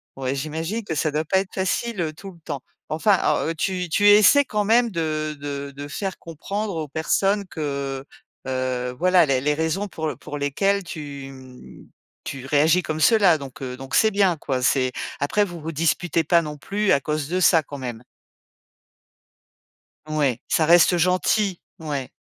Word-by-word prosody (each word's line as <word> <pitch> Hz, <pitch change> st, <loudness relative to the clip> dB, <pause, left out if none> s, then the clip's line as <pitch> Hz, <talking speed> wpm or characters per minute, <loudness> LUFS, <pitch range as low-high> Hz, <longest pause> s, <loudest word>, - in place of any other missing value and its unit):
ouais, 135 Hz, 0 st, -2 dB
j'imagine 160 Hz, +10 st, -3 dB
que 160 Hz, -, -3 dB
ça 150 Hz, +1 st, 0 dB
doit 155 Hz, +2 st, -1 dB
pas 190 Hz, +4 st, +2 dB
être 190 Hz, -1 st, -5 dB
facile, 195 Hz, +3 st, -1 dB
heu, 155 Hz, -2 st, -2 dB
tout 195 Hz, +5 st, -10 dB
le 170 Hz, -, -18 dB
temps. 135 Hz, -, -4 dB, 0.3 s
Enfin 185 Hz, +5 st, +3 dB
à -, -, +1 dB
heu, 165 Hz, -, -2 dB
tu 180 Hz, +1 st, -2 dB
tu 205 Hz, +5 st, +3 dB
essaies 215 Hz, +7 st, +7 dB
quand 210 Hz, -3 st, -1 dB
même 235 Hz, +2 st, +4 dB
de 155 Hz, -3 st, -2 dB
de 140 Hz, -1 st, -5 dB
de 145 Hz, +1 st, -7 dB
faire 190 Hz, +4 st, -4 dB
comprendre 195 Hz, +5 st, -5 dB
aux 155 Hz, -2 st, -3 dB
personnes 195 Hz, +7 st, 0 dB
que, 140 Hz, -4 st, -4 dB, 0.4 s
heu, 130 Hz, -1 st, -2 dB
voilà, 180 Hz, +2 st, +4 dB
les 135 Hz, -3 st, +1 dB
les 150 Hz, +2 st, +1 dB
raisons 160 Hz, +6 st, -1 dB
pour 160 Hz, -2 st, -4 dB
pour 145 Hz, -, -7 dB
lesquelles 195 Hz, +8 st, 0 dB
tu, 145 Hz, -4 st, -7 dB
hem, 130 Hz, -2 st, -13 dB, 0.4 s
tu 135 Hz, -1 st, -6 dB
réagis 155 Hz, +5 st, +3 dB
comme 155 Hz, 0 st, -3 dB
cela 200 Hz, -7 st, +5 dB
donc 135 Hz, -2 st, -10 dB
heu, 125 Hz, -1 st, -5 dB
donc 135 Hz, 0 st, -10 dB
c'est 220 Hz, -1 st, +4 dB
bien, 195 Hz, -4 st, +2 dB
quoi. 130 Hz, -3 st, -2 dB
C'est 130 Hz, 0 st, +2 dB, 0.3 s
après 175 Hz, +9 st, +1 dB
vous 175 Hz, -3 st, -8 dB
vous 160 Hz, +1 st, -6 dB
disputez 165 Hz, +1 st, +1 dB
pas 170 Hz, +2 st, +4 dB
non 150 Hz, -2 st, -6 dB
plus 205 Hz, +6 st, -1 dB
à 140 Hz, -, +2 dB
cause 150 Hz, -1 st, -2 dB
de 185 Hz, +2 st, -1 dB
ça 165 Hz, -3 st, +5 dB
quand 145 Hz, -1 st, -9 dB
même? 120 Hz, -2 st, -6 dB, 2.0 s
Ouais, 150 Hz, -6 st, 0 dB
ça 160 Hz, -, +2 dB
reste 175 Hz, +1 st, +5 dB
gentil? 185 Hz, +2 st, +1 dB, 0.2 s
Ouais. 145 Hz, -5 st, -4 dB
160 Hz, 180 wpm, -23 LUFS, 140-185 Hz, 2.0 s, essaies